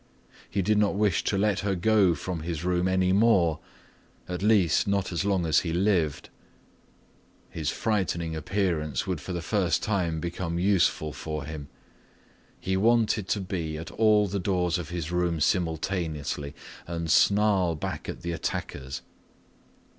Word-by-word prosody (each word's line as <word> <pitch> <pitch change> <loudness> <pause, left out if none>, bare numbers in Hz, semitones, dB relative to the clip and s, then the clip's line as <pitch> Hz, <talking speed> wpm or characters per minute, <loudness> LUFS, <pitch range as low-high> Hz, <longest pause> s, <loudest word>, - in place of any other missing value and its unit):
He 100 - -1
did 105 +2 +2
not 105 -2 +2
wish 100 -3 +1
to 100 - +1
let 100 0 +1
her 100 -1 -1
go 95 -2 +3
from 90 +2 -4
his 80 0 -4
room 90 0 +1
any 95 0 +2
more, 95 -7 +3 0.7
at 90 0 -4
least 100 -7 +3
not 100 -1 0
as 90 +3 -1
long 95 -4 +1
as 80 - +4
he 85 - -3
lived. 90 -5 0 1.2
His 80 -3 -2
frightening 85 -6 -1
appearance 85 -4 -1
would 90 -6 -3
for - - -6
the 85 -2 -3
first 95 -1 +1
time 90 -6 0
become 85 0 -3
useful 90 -5 +2
for 75 0 -5
him. 75 -1 -7 0.9
He 95 - -1
wanted 110 -1 +2
to 100 - 0
be 85 -5 -3
at 80 +1 -7
all 110 -2 +4
the 100 0 -2
doors 90 -2 0
of 80 -3 -6
his 85 -2 -4
room 90 -2 0
simultaneously 80 -3 -1 0.3
and 85 -2 -3
snarl 100 -4 +3
back 90 -1 -5
at - - -7
the 85 - -2
attackers. 70 -4 -4
90 Hz, 155 wpm, -27 LUFS, 80-100 Hz, 1.2 s, as